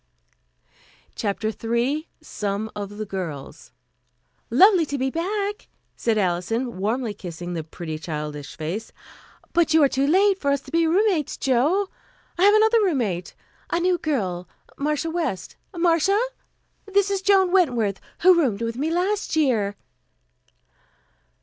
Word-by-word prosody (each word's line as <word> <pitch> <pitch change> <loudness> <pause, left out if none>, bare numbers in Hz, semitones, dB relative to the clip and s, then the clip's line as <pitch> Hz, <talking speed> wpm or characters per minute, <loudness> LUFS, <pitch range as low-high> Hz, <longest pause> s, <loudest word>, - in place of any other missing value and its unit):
CHAPTER 215 +1 -2
III 235 +8 -1
SOME 210 -6 -3
OF 205 0 -6
THE 215 - -3
GIRLS 170 -9 -6 0.8
"Lovely 380 -3 +6
to 285 - -3
be 265 0 -1
back," 405 +5 -2 0.3
said 225 -2 0
Alison, 205 +6 -1
warmly 220 +3 -1
kissing 175 -2 -7
the 165 -2 -3
pretty 160 0 -7
childish 150 -3 -6
face," 170 +8 -4 0.6
but 330 -2 +3
you 320 - +6
are - - +6
too 270 +1 0
late 385 +4 +4
for 280 - 0
us 280 -1 +1
to - - -14
be 330 0 +3
roommates, 360 -3 +1
Jo. 290 +10 +2 0.5
I 375 - +5
have 410 +1 +6
another 440 +1 +5
roommate, 235 - -1 0.3
a 340 - +1
new 355 0 +1
girl, 185 - -2 0.3
Marcia 300 +3 -1
West. 315 - -3 0.2
Marcia, 340 +4 +3 0.7
this 400 0 +2
is 395 -1 0
Joan 385 -2 +4
Wentworth, 240 - +2 0.2
who 365 +1 +7
roomed 240 -10 +1
with 230 +1 -3
me 295 +4 -1
last 370 +3 0
year." 230 -10 +1
275 Hz, 135 wpm, -23 LUFS, -, 0.8 s, who